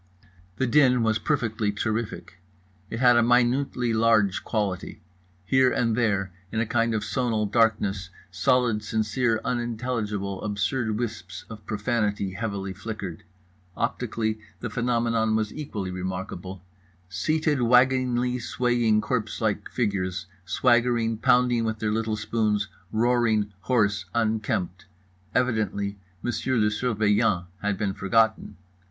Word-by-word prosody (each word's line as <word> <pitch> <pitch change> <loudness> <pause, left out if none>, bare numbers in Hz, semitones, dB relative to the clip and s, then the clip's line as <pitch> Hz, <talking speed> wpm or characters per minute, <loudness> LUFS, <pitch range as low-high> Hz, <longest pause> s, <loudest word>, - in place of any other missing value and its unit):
The 130 - 0
din 125 -2 +4
was 110 -1 +2
perfectly 115 -7 0
terrific. 105 -4 -3 0.5
It 115 - -4
had 125 -2 +6
a - - +6
minutely 125 0 +2
large 110 -3 +3
quality. 100 -5 -2 0.5
Here 130 +4 +4
and 115 -2 +1
there, 100 -5 +1 0.2
in 110 - -1
a 115 - +1
kind 115 0 +1
of 105 - -1
sonal 110 +1 0
darkness, 100 -4 +1 0.2
solid 110 +4 +2
sincere 110 +2 0
unintelligible 115 -5 -2
absurd 105 +2 -1
wisps 95 -6 -5
of 110 -2 -9
profanity 105 -3 -1
heavily 100 -3 -3
flickered. 100 -3 -6 0.6
Optically 115 -2 -1 0.2
the 115 - -5
phenomenon 115 -1 +1
was 110 -1 -1
equally 105 -11 -5
remarkable: 95 0 -5 0.4
seated 150 - 0
waggingly 125 0 +3
swaying 120 -2 +1
corpselike 110 -2 -2
figures, 95 -6 -1 0.2
swaggering, 115 +2 +2
pounding 125 -1 +3
with 110 -1 -1
their 105 0 -1
little 110 0 -1
spoons, 105 -1 0 0.2
roaring, 110 -3 +2
hoarse, 100 -1 +1
unkempt. 105 -4 -1 0.5
Evidently 105 -5 0 0.2
Monsieur 125 +1 -1
le 105 -1 +3
Surveillant 105 -4 +1 0.2
had 105 -1 0
been 100 -1 -1
forgotten. 110 +3 +1
110 Hz, 115 wpm, -26 LUFS, 100-120 Hz, 0.6 s, had